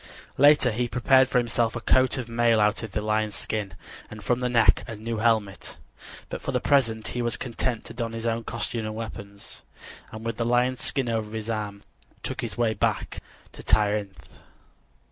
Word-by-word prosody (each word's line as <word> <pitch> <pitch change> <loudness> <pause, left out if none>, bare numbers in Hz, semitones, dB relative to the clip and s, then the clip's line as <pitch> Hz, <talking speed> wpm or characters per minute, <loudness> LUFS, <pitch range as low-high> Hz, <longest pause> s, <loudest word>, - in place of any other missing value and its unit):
Later 145 -3 +6
he 120 +3 -1
prepared 130 +2 +4
for 125 - 0
himself 120 -1 +1
a - - -2
coat 130 +3 +3
of 125 -3 -4
mail 115 -1 +3
out 105 +1 +2
of 110 -3 -6
the 105 - -1
lion's 110 0 0
skin, 105 -3 -3 0.3
and 105 -1 -10
from 125 +4 +1
the 125 0 -1
neck, 115 -2 +4
a 115 - -6
new 115 +2 -4
helmet; 110 -3 0 0.5
but - - -6
for - - -3
the - - +1
present 115 -6 +2
he 125 - -3
was 120 -1 -1
content 120 -1 -3
to - - -8
don 115 -1 -4
his 115 0 -5
own 115 0 -1
costume 115 0 -3
and 110 - -5
weapons, 100 -3 -8 0.5
and 110 +1 -8
with 115 -1 -3
the 115 - 0
lion's 125 +2 +1
skin 135 -3 +1
over 110 -2 -2
his 110 +1 -3
arm 105 -2 -4 0.4
took - - -4
his - - -5
way 115 -2 +2
back - - -1 0.3
to - - -11
Tirynth. 100 -6 0
115 Hz, 195 wpm, -26 LUFS, 110-120 Hz, 0.5 s, Later